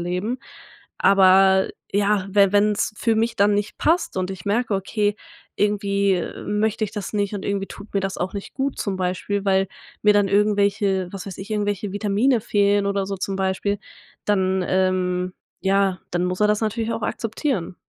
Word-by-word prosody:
leben. 180 +8 -2 0.6
Aber 190 0 +5 0.2
ja, 205 -1 +2
wenn 200 -1 +4
wenn's 205 +1 +2
für 225 +1 +1
mich 225 +1 0
dann 205 +1 +4
nicht 205 +1 -2
passt 335 - +1
und 185 0 -1
ich 190 -2 -8
merke: 215 +2 0
„Okay, 205 +2 0 0.4
irgendwie 200 -3 +1 0.2
möchte 215 +1 0
ich 205 - -5
das 205 -3 -5
nicht 205 -1 -1
und 200 - -5
irgendwie 200 -1 -1
tut 205 +2 -12
mir 200 - +2
das 195 0 -3
auch 180 +2 -3
nicht 200 -1 -7
gut.", 270 0 -2
zum 200 -2 -2
Beispiel, 185 +2 -2
weil 195 -1 +2 0.3
mir 210 0 +6
dann 205 -1 +3
irgendwelche, 200 -2 +2
was 195 - -6
weiß 195 - -7
ich, 195 +3 -8
irgendwelche 205 -2 -1
Vitamine 215 +5 +2
fehlen 205 -1 +2
oder 200 -1 0
so 195 0 -3
zum 190 +1 -3
Beispiel, 190 +1 -1 0.5
dann, 190 -2 +1
ähm, 185 -1 0 0.3
ja, 195 -1 +2
dann 175 0 0
muss 180 +1 -2
er 210 - +4
das 210 0 +2
natürlich 225 +1 -1
auch 225 - -4
akzeptieren. 225 - -2
200 Hz, 180 wpm, -22 LUFS, 190-210 Hz, 0.6 s, mir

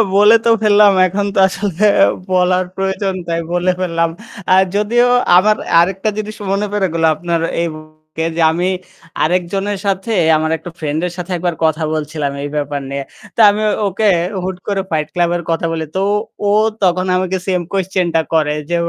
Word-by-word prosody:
বলে 210 +3 +6
তো - - +4
ফেললাম। 205 -1 +6 0.2
এখন 200 +3 -2
তো - - +2
আসলে 195 0 -3 0.5
বলার 180 0 +2
প্রয়োজন 195 0 -2
তাই 170 0 -1
বলে 175 +1 +1
ফেললাম। 165 -2 0 0.4
আ - - +6 0.2
যদিও 235 +4 +2 0.3
আমার 215 +3 +4 0.3
আরেকটা 190 +4 -1
জিনিস 215 0 -5 0.2
মনে 200 +1 0
পড়ে 195 -2 +1
গেলো 165 -1 +2
আপনার 170 +1 -2 0.2
এই 170 - 0
মুহুর্তে 155 +1 -8
যে - - +1
আমি 175 +3 -1 0.5
আরেকজনের 190 +4 -1
সাথে 195 +3 -1 0.3
আমার 160 +1 -1
একটা 175 - -9
ফ্রেন্ড 155 0 -2
এর - - -6
সাথে 180 +1 -6
একবার 175 -1 -2
কথা 160 0 0
বলছিলাম 150 -2 -3
এই 145 - -4
ব্যাপার 145 -1 -2
নিয়ে। 140 0 -4 0.3
তো - - -7
আমি 210 +1 -1 0.3
ওকে 210 +3 0 0.4
হুট 185 -1 -4
করে 200 -1 0
ফাইট 155 -1 0
ক্লাব 175 -1 +1
এর 175 - -7
কথা 165 0 -1
বলি। 160 -1 -3
তো 190 - 0 0.5
ও - - +3 0.3
তখন 185 0 +2
আমাকে 185 0 -1
সেম 180 -2 +1
কুয়েসচেনটা 180 -4 0
করে। 155 -2 +2 0.2
যে 175 - 0
180 Hz, 175 wpm, -16 LUFS, 160-195 Hz, 0.5 s, বলে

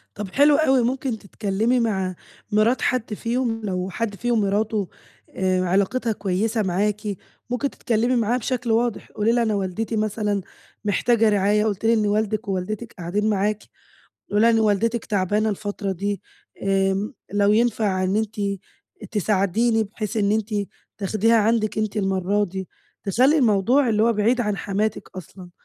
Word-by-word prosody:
طَب 210 -1 -5
حلو 285 +1 +5
أوي، 270 -4 +3
ممكن 255 -1 -1
تتكلّمي 215 +4 -1
مع 190 -5 -1 0.4
مرات 215 +4 +3
حد 240 -3 0
فيهُم، 230 +1 -1
لو 185 -2 -2
حد 215 +1 -3
فيهُم 240 +1 0
مراتُه 205 0 0 0.4
آآ 185 -1 0
علاقتها 200 +6 +1
كويسة 210 +3 -1
معاكِ، 205 +3 0 0.5
ممكن 250 +3 -1
تتكلّمي 240 0 0
معاها 235 +1 +1
بشكل 245 -1 -2
واضح. 230 0 0
قولي 210 +2 +1
ليها 240 0 +2
أنا 220 -2 0
والدتي 200 +4 -2
مثلًا 210 -1 -1 0.4
محتاجة 225 +2 +3
رعاية، 205 +1 +2
قُلتِ 210 0 -2
لي 230 - +5
إن 215 -2 +2
والدِك 215 +1 0
ووالدتِك 200 +4 -3
قاعدين 200 +5 -1
معاكِ. 210 +1 0 0.7
قولي 205 - +2
ليها 230 - +6
إن 225 - +3
والدتِك 220 +2 +1
تعبانة 205 +1 0
الفترة 205 -1 -3
دي، 200 +1 -3 0.4
آمم 195 +3 0 0.2
لو 205 0 +3
ينفَع 215 -4 +1
إن 190 +2 +1
أنتِ 215 -1 -2 0.7
تساعديني 215 +3 +1
بحيث 215 +1 -5
إن 205 -1 +2
أنتِ 215 0 -1 0.4
تاخديها 215 +3 +2
عندِك 215 0 +1
أنتِ 215 0 -2
المَرّة 195 0 +1
دي. 190 -1 -6 0.4
تخَلّي 255 +10 +3
الموضوع 245 +3 +3
اللي 215 -1 +2
هو 230 +1 +4
بعيد 230 +4 +2
عن 210 -3 0
حماتِك 205 +2 -2
أصلًا. 180 0 -10
215 Hz, 150 wpm, -23 LUFS, 200-230 Hz, 0.7 s, ليها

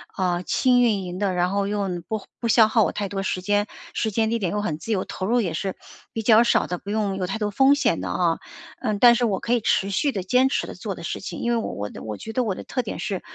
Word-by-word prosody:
啊， 180 -2 0
轻 250 +5 +3
运 215 -5 +2
营 180 0 -6
的， 200 -2 0
然 180 0 +1
后 200 0 0
又 205 -1 -1 0.2
不 220 -2 -3 0.2
不 235 - -2
消 225 -1 +6
耗 220 0 +3
我 - - 0
太 205 - -3
多 195 0 -3
时 185 -1 -2
间， 205 +2 +1 0.3
时 220 - 0
间 220 +1 +1
地 230 - 0
点 185 -4 -1
又 210 - -1
很 165 -7 -2
自 225 - -5
由， 195 -3 0
投 190 - -4
入 240 +3 +3
也 175 -8 -1
是， 190 +4 -3 0.4
比 225 - -4
较 225 +1 +6
少 235 - +3
的， 180 0 -4
不 200 - -10
用 205 -2 0
有 185 -1 -2
太 195 - -3
多 210 -1 -2
风 270 +5 +5
险 285 - +1
的 - - -4
啊， - - +1 0.4
嗯， 215 -5 -1
但 240 +3 +8
是 240 +1 0
我 200 -4 0
可 235 - -1
以 240 - +2
持 195 -1 +1
续 280 +9 +1
地 195 -7 -3
坚 250 +7 +3
持 - - -1
地 - - -7
做 - - -5
的 - - -10
事 - - -3
情， - - -6
因 235 - 0
为 235 - +2
我 225 - -3
我 105 0 -4
我 105 -2 -5
觉 220 - -8
得 255 - +1
我 205 -5 -1
的 - - -8
特 255 - -2
点 220 - -6
是， 195 -3 -3
205 Hz, 315 characters per minute, -24 LUFS, 190-230 Hz, 0.4 s, 但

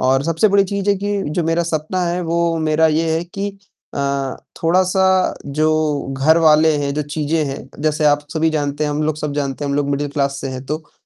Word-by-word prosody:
और 130 +1 +2
सबसे 165 +6 +2
बड़ी 200 0 +4
चीज़ 200 +1 -3
है - - +4
कि 205 +1 -2
जो 170 +3 0
मेरा 165 +1 +1
सपना 165 +3 -2
है 175 +1 -1
वो 170 0 0
मेरा 155 0 +2
ये 160 +1 +1
है 165 - 0
कि 195 +3 -4 0.5
अ, 140 -1 -1 0.3
थोड़ा-सा 185 +2 +3
जो 150 +2 +1 0.5
घरवाले 155 +1 +5
हैं, 140 -1 -1
जो 150 - -1
चीज़ें 150 +2 -1
हैं, 135 0 -6
जैसे 155 0 +1
आप 145 0 +2
सभी 160 0 +2
जानते 145 -1 -1
हैं, 150 - -1
हम 145 +1 -1
लोग 155 -1 -1
सब 150 -1 -3
जानते 140 0 -2
हैं, 140 - -2
हम 140 - 0
लोग 145 -1 0
मिडिल 145 +1 -1
क्लास 140 -1 -1
से 135 - -4
हैं 130 0 -6
तो 155 +2 -5
155 Hz, 215 wpm, -19 LUFS, 145-170 Hz, 0.5 s, घरवाले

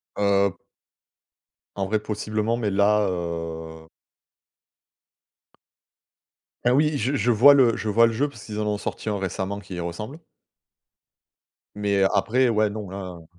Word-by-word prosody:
Heu 100 -2 +2 1.2
en 100 - -1
vrai 110 +1 0
possiblement 105 +1 -2
mais 110 -3 -1
là, 100 +2 +3
heu 80 -2 -5 2.8
Ah 125 - +4
oui 150 +2 +2
je 130 +3 -1
je 120 +3 0
vois 125 +6 +7
le 125 -5 +4
je 110 - -3
vois 115 +3 +5
le 115 - -2
jeu 140 +6 0
parce 115 -6 -13
qu'ils 105 -1 -6
en 105 - -1
ont 105 -1 -1
sorti 110 - -5
un 105 - -1
récemment 95 +1 -3
qui 100 -2 -9
y 90 - -4
ressemble 105 - -6 1.6
mais 100 -1 +1
après 120 +5 +2
ouais, 110 -1 +2
non 105 -2 -6
là 90 -3 -8
105 Hz, 145 wpm, -24 LUFS, 95-115 Hz, 2.8 s, vois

